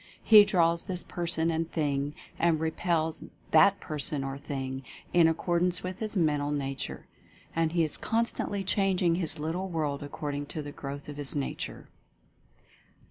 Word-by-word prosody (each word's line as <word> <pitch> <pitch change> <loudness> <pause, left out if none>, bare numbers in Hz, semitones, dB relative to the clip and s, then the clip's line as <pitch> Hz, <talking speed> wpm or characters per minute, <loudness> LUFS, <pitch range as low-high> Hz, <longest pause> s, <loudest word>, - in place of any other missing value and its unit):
He 210 -2 +9
draws 170 -4 +2
this 180 -2 -3
person 170 -1 +1
and 165 0 -2
thing, 145 -2 -1 0.2
and 165 -2 +3
repels 160 0 -1 0.3
that 195 +5 +6
person 150 -3 0
or 135 0 -4
thing, 135 -2 -5 0.3
in 170 -2 +6
accordance 175 +2 +1
with 185 0 -5
his 215 -2 -2
mental 150 -4 +1
nature. 135 -2 -4 0.5
And 165 0 +1
he 170 -1 +3
is 155 - 0
constantly 225 -3 -1
changing 190 -3 +2
his 170 -2 -2
little 165 +5 -3
world 150 -4 -2
according 145 0 -4
to 155 - -5
the 145 - -7
growth 140 0 -7
of 145 -1 -7
his 145 -1 -1
nature. 140 -2 -4
160 Hz, 150 wpm, -29 LUFS, 145-175 Hz, 0.5 s, He